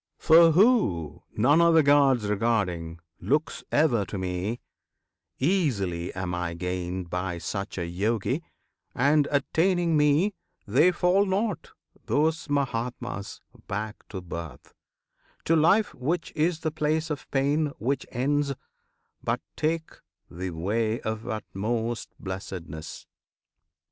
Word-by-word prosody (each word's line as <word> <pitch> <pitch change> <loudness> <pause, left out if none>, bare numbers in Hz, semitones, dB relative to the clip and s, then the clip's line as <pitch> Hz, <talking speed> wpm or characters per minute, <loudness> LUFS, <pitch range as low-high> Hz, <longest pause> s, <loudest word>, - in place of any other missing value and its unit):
For 165 0 +6
who, 95 - +3 0.2
none 145 +9 +5
other 165 -2 +5
Gods 140 -5 +4
regarding, 100 -6 0 0.2
looks 150 +3 -1
Ever 140 -8 +3
to 100 - -6
Me, 95 +5 -3 0.8
easily 115 - 0
am 95 -1 -3
I 90 -1 -2
gained 90 0 -4
By 90 -1 -2
such 100 +4 -5
a 85 - -2
Yogi; 110 - -1 0.5
and, 145 +3 +3
attaining 165 +4 +2
Me, 150 +7 +3 0.3
They 130 - +4
fall 180 +3 +2
not 195 -1 -1 0.3
those 160 +2 +1
Mahatmas 120 -6 -3 0.3
back 105 +2 -3
to 95 - -6
birth, 85 -6 -8 0.7
To 165 - +3
life, 195 +7 +4
which 160 +7 -2
is 160 +1 +1
the 155 - -1
place 155 +1 -1
of 145 - -5
pain, 145 +3 +1
which 135 +4 -2
ends, 140 +2 0 0.7
But - - -1
take 160 +1 -1 0.4
the 90 +2 -4
way 110 +7 -1
of 110 +1 -4
utmost 115 +1 -3
blessedness. 95 -5 -7
120 Hz, 115 wpm, -26 LUFS, 95-155 Hz, 0.8 s, For